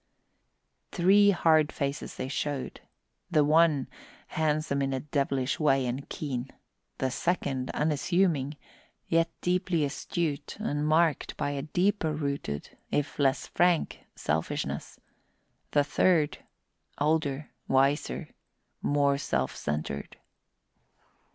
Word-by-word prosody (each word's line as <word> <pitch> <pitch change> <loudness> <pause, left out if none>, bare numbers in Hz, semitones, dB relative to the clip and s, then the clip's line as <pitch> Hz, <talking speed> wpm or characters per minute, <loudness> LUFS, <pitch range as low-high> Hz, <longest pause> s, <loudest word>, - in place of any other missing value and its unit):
Three 200 +3 +5
hard 160 -5 +4
faces 140 0 -3
they - - -4
showed: 140 0 -3 0.5
the 155 -4 +4
one, 155 -2 +4 0.4
handsome 155 -2 0
in 135 0 0
a 130 - -1
devilish 140 -2 -1
way 135 -4 +3
and 125 +3 -4
keen; 135 -6 -4 0.5
the 130 -1 -1
second, 135 -4 -1
unassuming, 150 -1 +1 0.5
yet 165 0 +2
deeply 180 -3 +1
astute 150 +1 -3
and 150 -9 -1
marked 160 -2 +2
by 145 - -1
a 140 -1 -3
deeper 170 +2 +1
rooted, 140 - -3
if 145 0 -1
less 135 -1 +2
frank, 175 -2 +1 0.2
selfishness; 80 +1 -2 0.7
the 145 - +3
third, 155 0 +2 0.6
older, 150 -1 0 0.2
wiser, 135 - +1 0.5
more 140 -1 +2
self 65 - -1
centred. 75 -1 -4
145 Hz, 105 wpm, -28 LUFS, 135-160 Hz, 0.7 s, Three